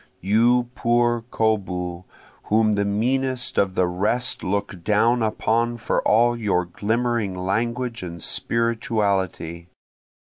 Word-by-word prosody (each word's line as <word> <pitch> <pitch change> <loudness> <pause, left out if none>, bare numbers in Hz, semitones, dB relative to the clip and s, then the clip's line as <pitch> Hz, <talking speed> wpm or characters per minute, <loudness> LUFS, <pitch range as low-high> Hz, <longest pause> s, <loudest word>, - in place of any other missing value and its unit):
You 120 +5 +2
poor 120 -1 +1
koboo 90 -6 -1 0.4
whom 110 0 +3
the 100 0 0
meanest 125 +5 0
of 95 -2 +1
the 90 - +3
rest 105 +8 -1
look 100 -2 -3
down 115 +4 +2
upon 115 +2 0
for 115 - -1
all 120 +2 +4
your 100 -6 0
glimmering 110 +2 -1
language 115 +6 -2
and 85 -2 -7
spirituality! 100 -7 -1
110 Hz, 110 wpm, -23 LUFS, 95-120 Hz, 0.4 s, all